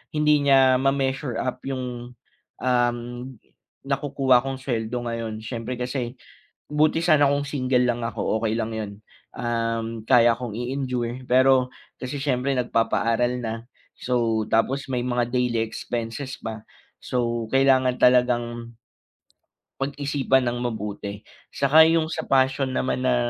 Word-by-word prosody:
hindi 150 0 +4
niya 130 -2 +5
ma-measure 135 -1 0
up 130 0 -3
yung, 125 -2 -5 0.5
um, 120 -1 +2 0.9
nakukuha 135 -2 +2
kong 135 +2 -4
sweldo 115 -3 -2
ngayon 115 -2 -4
syempre 115 +1 -5
kasi 125 0 -4 0.5
buti 155 +2 +2
sana 155 -4 +4
kung 145 0 -1
single 130 -3 +1
lang 120 -1 -1
ako 110 -1 -1
okey 110 - +1
lang 115 0 -2
yun, 105 -2 -4 0.4
um, 115 -1 -2
kaya 120 -1 +5
kong 120 -3 -6
i-endure 125 0 -3
pero 130 0 +3 0.2
kasi 130 +2 -5
syempre 135 -1 0
nagpapaaral 120 0 +1
na 115 -2 -3 0.4
so, 115 -3 0
tapos 135 +5 +1
may 125 - 0
mga 120 -1 -1
daily 125 -3 +1
expenses 120 +4 -5
pa 110 -1 -6 0.4
so 120 -2 -2
kailangan 130 -1 +3
talagang 120 -2 +2 1.0
pag-isipan 135 -2 0
nang 120 +1 -2
mabuti, 105 -3 -4 0.3
'saka 140 +3 +5
yung 165 -1 +2
sa 160 0 -4
passion 130 0 +2
naman 130 0 -1
na 125 -1 +3
125 Hz, 125 wpm, -24 LUFS, 115-135 Hz, 1.0 s, niya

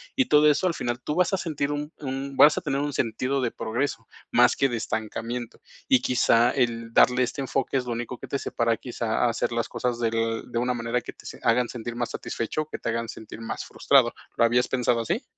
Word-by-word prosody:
Y 265 - +3
todo 150 -5 +5
eso, 150 +5 +2
al 175 - +1
final 120 -4 -3
tú 150 - -2
vas 180 +2 +2
a - - +3
sentir 150 -5 -2
un 150 +1 -4
un 135 -1 -5
vas 150 +3 +7
a - - 0
tener 140 -2 -1
un 145 0 -2
sentido 125 +3 -1
de 120 -2 0
progreso, 115 0 -3 0.2
más - - +5
que 135 - +2
de 120 - -2
estancamiento. 115 +2 -4 0.3
Y 130 - +5
quizá 120 -2 +3
el 115 -3 -1
darle 125 +2 +5
este 125 +3 -3
enfoque 135 0 -1
es 125 - -2
lo 120 - -4
único 120 +1 -4
que - - -9
te 140 - -2
separa 115 -3 0
quizá 120 -2 -1
a - - +3
hacer 115 - -1
las 115 -1 -1
cosas 120 -1 -2
del 115 -1 0
de 120 - -2
una 125 +1 0
manera 120 +1 -1
que - - -8
te - - -18 0.2
hagan 120 +1 +3
sentir 120 -1 -6
más 120 -1 -2
satisfecho 115 +7 -3
o 155 - -7
que - - -5
te - - -6
hagan 115 0 -2
sentir 110 +1 -9
más 115 - -5
frustrado, - - +3 0.2
¿lo 115 - +5
habías 120 +2 +2
pensado 125 -2 +1
así? 115 - -2
125 Hz, 235 wpm, -25 LUFS, 115-135 Hz, 0.3 s, vas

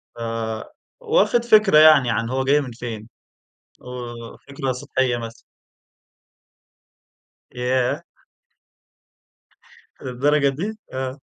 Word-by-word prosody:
فواخد 115 - -2
فكرة 215 -7 +5
يعني 155 -5 +7
عن 115 0 -1
هو 130 +1 -1
جاي 140 +2 +3
من 130 -4 -7
فين، 115 -2 -7 0.7
وفكرة 125 +2 -7
سطحية 130 -1 -1
مثلًا. 115 0 -8 2.1
ياه! 125 0 -1 2.0
للدرجة 140 +3 +1
دي؟ 195 +11 -4 0.2
آه. 130 +1 -4
130 Hz, 80 wpm, -22 LUFS, 120-145 Hz, 2.1 s, يعني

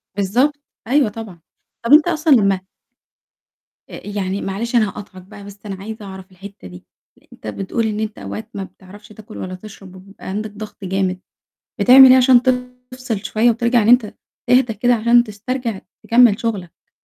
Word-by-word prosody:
بالضبط، 235 +9 +1 0.3
أيوه 270 -3 +2
طبعًا. 205 -6 -10 0.4
طب 235 - +3
أنت 300 +2 +7
أصلًا 320 -2 0
لما 195 -4 +2 1.3
أأ، - - -11
يعني 200 -1 -3
معلش 220 +6 -4
أنا 220 -3 +3
هاقاطعك 195 -2 -11
بقى 195 +2 -14
بس 200 0 -12
أنا 195 - -5
عايزة 220 0 -8
أعرف 190 0 -11
الحتة 195 - -12
دي، 90 0 -13 0.5
أنت - - -12
بتقول 195 - -3
إن 210 0 -3
أنت 220 -1 -4
أوقات 220 +1 -7
ما 200 - -5
بتعرفش 200 +3 -15
تاكل 215 0 -13
ولا 185 0 -6
تشرب 195 -1 -13
وبيبقى 195 +2 -14
عندك 210 +2 -4
ضغط 210 0 -10
جامد، 190 -1 -2 0.6
بتعمل 260 +1 +8
إيه 255 - +7
عشان 255 -1 +5
تفصِل 250 -3 -4
شوية 225 +2 +2
وترجع 235 0 +1
إن 210 - -1
أنت 245 -3 +3 0.4
تهدى 250 -2 +3
كده 245 +3 +2
عشان 235 +1 +3
تسترجع 225 0 -5 0.3
تكمل 230 -3 +4
شغلك؟ 200 -8 -6
215 Hz, 165 wpm, -18 LUFS, 195-245 Hz, 1.3 s, بتعمل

